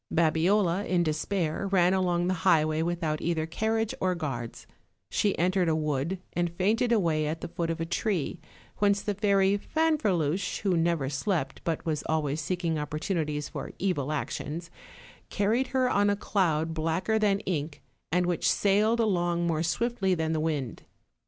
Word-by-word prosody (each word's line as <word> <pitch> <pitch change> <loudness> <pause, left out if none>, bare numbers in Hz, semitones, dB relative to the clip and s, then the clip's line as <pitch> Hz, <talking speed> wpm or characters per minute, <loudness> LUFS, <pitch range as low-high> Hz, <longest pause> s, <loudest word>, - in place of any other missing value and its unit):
Babiola, 170 +4 +2
in 175 -2 +2
despair, 160 +3 -1
ran 185 -2 +3
along 175 -2 +1
the 185 - +1
highway 155 -1 +3
without 165 -2 -1
either 165 -2 0
carriage 220 +6 -1
or 185 -1 +1
guards; 135 -9 -5 0.5
she 205 - +1
entered 180 0 +2
a 160 - +2
wood, 150 +3 -1 0.2
and 175 -1 0
fainted 220 +6 +1
away 165 -9 +2
at 160 +2 -3
the - - -4
foot 165 0 -3
of 165 0 -2
a 165 - -1
tree, 175 -2 -1 0.4
whence 200 -1 +2
the 205 - -1
Fairy 200 -1 +3
Fanferluche, 200 - 0
who 195 -3 +1
never 165 -4 +1
slept, 145 0 -2
but 165 -2 -2
was 155 -3 -1
always 155 -1 0
seeking 170 0 -1
opportunities 150 0 -2
for - - -6
evil 160 -7 -1
actions, 155 +3 -4 0.6
carried 220 +6 +1
her 260 -1 +1
on 205 -4 +3
a 205 - +2
cloud 165 -6 0
blacker 165 +7 0
than 200 -2 +2
ink, 155 -6 -3 0.3
and 180 +2 +2
which 175 -1 +1
sailed 210 +3 +2
along 175 -5 +1
more 160 -2 0
swiftly 190 +3 0
than 160 -1 -1
the 160 - 0
wind. 150 -6 -2
175 Hz, 160 wpm, -28 LUFS, 155-200 Hz, 0.6 s, ran